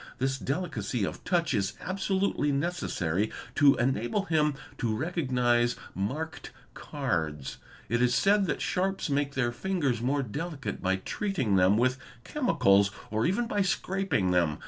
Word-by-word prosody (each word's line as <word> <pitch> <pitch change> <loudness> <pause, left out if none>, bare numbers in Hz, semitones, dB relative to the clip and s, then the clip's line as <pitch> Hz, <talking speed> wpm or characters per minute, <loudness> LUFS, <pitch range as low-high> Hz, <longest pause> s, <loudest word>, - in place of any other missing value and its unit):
This 135 +1 -1
delicacy 130 - -2
of - - -4
touch 170 -2 +1
is 100 -2 0
absolutely 190 -5 0
neces. 170 +6 -1
sary 90 +4 0 0.2
to 145 -2 +6
enable 120 - 0
him 150 -5 +1 0.2
to 115 -4 0
recognise 125 -5 +1 0.2
marked 145 - -4 0.2
cards. 75 -4 -3 0.3
It 120 +1 +1
is 125 0 +3
said 200 +7 +4
that - - -1
sharps 190 -1 -1
_ - - +1
make 140 0 0
their 120 -3 +1
fingers 140 -5 -1
more 135 +3 +1
delicate 145 +4 -5
by 95 0 +2
treating 130 - -1
them 95 +2 +4
with 130 +2 +2 0.2
chemicals 100 - +3 0.2
or 110 +1 +1
even 195 +7 +1
a. - - -9
by 205 - +1
scraping 190 - 0
them. 85 -4 +2
135 Hz, 150 wpm, -28 LUFS, 110-175 Hz, 0.3 s, to